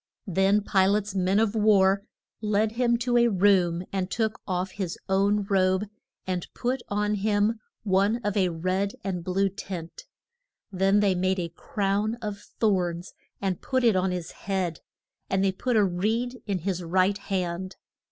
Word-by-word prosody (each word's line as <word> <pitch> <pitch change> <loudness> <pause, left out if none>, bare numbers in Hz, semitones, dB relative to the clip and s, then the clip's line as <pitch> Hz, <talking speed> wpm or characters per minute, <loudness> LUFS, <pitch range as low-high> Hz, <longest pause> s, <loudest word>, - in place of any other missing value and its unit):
Then 195 +2 +2
Pi 190 -2 +3
late's 205 0 0
men 190 +1 +2
of 220 -2 +2
war 200 -3 +4 0.4
led 215 0 +1
him 235 0 +2
to 240 0 +1
a 240 0 +5
room, 185 -4 +3
and 190 -1 -1
took 220 +1 -1
off 185 0 -1
his 185 -3 -4
own 200 +2 +2
robe, 190 0 +2 0.4
and 180 -2 -3
put 250 +1 -1
on 210 +1 0
him 210 +2 +1 0.2
one 200 +1 +2
of 205 -1 -1
a 190 -3 +3
red 185 +4 -1
and 180 -3 -3
blue 190 +2 +1
tint. 185 - -7 0.7
Then 195 +2 +3
they 200 -2 +3
made 185 +1 0
a 170 -2 -2
crown 200 +5 -1
of 210 -4 -5
thorns 180 -4 -1 0.3
and 190 -3 -2
put 260 -1 0
it 230 -4 +4
on 185 0 +2
his 180 -2 -4
head; 185 -5 -3 0.5
and 190 0 +1
they 195 - +3
put 245 +6 -2
a 210 -2 +5
reed 220 +7 -1
in 200 -2 0
his 185 -2 -1
right 185 +4 +1
hand. 185 -1 -3
195 Hz, 165 wpm, -26 LUFS, 185-210 Hz, 0.7 s, a